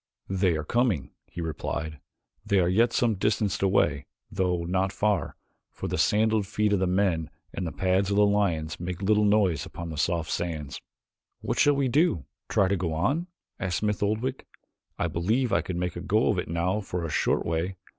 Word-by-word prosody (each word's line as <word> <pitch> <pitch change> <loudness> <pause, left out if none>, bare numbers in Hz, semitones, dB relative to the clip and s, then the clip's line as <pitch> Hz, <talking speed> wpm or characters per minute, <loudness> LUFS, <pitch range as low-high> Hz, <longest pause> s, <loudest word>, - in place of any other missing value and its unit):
"They 95 -3 +2
are 80 - -3
coming," 115 - 0 0.2
he 85 - -7
replied. 80 -1 -4 0.4
"They 100 -2 +2
are 85 - +3
yet 115 +6 +3
some 120 -2 +2
distance 105 0 0
away, 100 0 +2 0.2
though 90 -2 0
not 95 +2 0
far, 105 +2 0 0.3
for - - -6
the - - -2
sandaled 110 -1 +2
feet 105 0 +1
of 100 - +2
the 95 - +1
men 90 -4 +1 0.2
and 90 - -3
the - - -4
pads 95 +1 +1
of 100 - +1
the 105 0 +5
lions 90 -6 0
make 90 +2 -5
little 105 +1 +3
noise 100 -6 +3
upon 85 -1 -7
the 75 - -5
soft 85 0 0
sands." 80 -5 -3 0.6
"What - - -2
shall 145 0 +5
we 140 -1 +1
do 130 - +2 0.2
try 100 - +3
to 100 - +1
go 85 -3 -2
on?" 145 - 0 0.3
asked 90 -2 -1
Smith 105 -1 -1
Oldwick. 110 +6 -1 0.5
"I - - 0
believe 105 +9 0
I - - +3
could 90 - -4
make 90 0 -2
a 85 - -5
go 105 +5 +2
of 95 - +1
it - - -3
now 85 +5 0
for 90 -4 -4
a - - -3
short - - +1
way. 85 +3 -1
95 Hz, 195 wpm, -27 LUFS, 85-105 Hz, 0.6 s, the